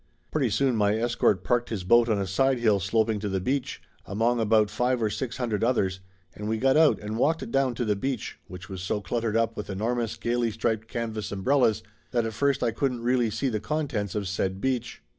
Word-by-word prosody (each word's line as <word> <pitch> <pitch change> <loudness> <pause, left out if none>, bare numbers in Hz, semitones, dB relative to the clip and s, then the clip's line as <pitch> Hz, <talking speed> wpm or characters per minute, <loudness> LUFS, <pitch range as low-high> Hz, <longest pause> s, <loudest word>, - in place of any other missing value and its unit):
Pretty 140 -6 +1
soon 130 +3 +1
my 105 -1 +2
escort 115 -5 +1
parked 120 +2 +1
his 105 -5 -3
boat 120 +5 +4
on 110 - +2
a 100 - -1
sidehill 120 +1 +2
sloping 110 +3 +1
to 105 0 -3
the 95 0 -1
beach, 130 +7 -2 0.2
among 115 +5 +1
about 110 -1 +3
five 125 +3 +1
or 110 -2 0
six 125 +1 -4
hun 125 -2 -2
dred 105 -1 -1
others, 95 -6 +1 0.3
and 105 +1 -5
we 110 - 0
got 130 +3 +3
out 155 -1 +5
and 105 +2 -4
walked 160 -3 +1
down 135 -3 +1
to 120 - -2
the 105 -1 +1
beach, 130 +3 -4
which 90 +2 -9
was 95 -3 -7
so 95 +3 -1
cluttered 115 +1 -1
up 115 0 +1
with 105 - -6
enormous 115 +3 -2
gayly 120 0 0
striped 110 0 -2
canvas 110 -3 -4
umbrellas 110 +2 +2 0.3
that 120 -2 0
at 110 - -3
first 140 +3 +1
I 120 - +2
couldn't 125 -1 -2
really 120 -1 +2
see 110 +6 -1
the 110 -3 -1
contents 125 - -2
of 100 -2 -2
said 95 0 -2
beach. 125 0 -2
115 Hz, 215 wpm, -26 LUFS, 105-125 Hz, 0.3 s, out